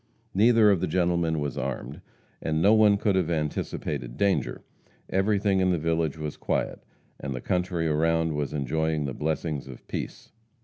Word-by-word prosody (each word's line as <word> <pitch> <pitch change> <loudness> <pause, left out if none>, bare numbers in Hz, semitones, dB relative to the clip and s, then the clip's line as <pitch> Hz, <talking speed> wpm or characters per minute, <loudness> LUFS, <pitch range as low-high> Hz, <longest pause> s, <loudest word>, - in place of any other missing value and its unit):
Neither 110 +1 +5
of 95 -4 +1
the 95 - 0
gentlemen 85 -3 +1
was 70 -3 -3
armed, 65 -1 -4 0.4
and 80 0 0
no 100 +6 +5
one 105 -2 +5
could 100 -1 +1
have 90 -3 +1
anticipated 75 -6 -3
danger. 100 -1 0 0.5
Everything 100 0 +2
in 95 0 +3
the 90 - +2
village 80 -1 0
was 75 -1 -5
quiet, - - -2 0.4
and 65 -1 -4
the - - -4
country 90 +2 -1
around 80 +1 +1
was 75 -2 -2
enjoying 75 +2 -1
the 65 - -3
blessings 75 -1 -2
of 65 -2 -11
peace. - - -6
80 Hz, 165 wpm, -27 LUFS, 75-95 Hz, 0.5 s, Neither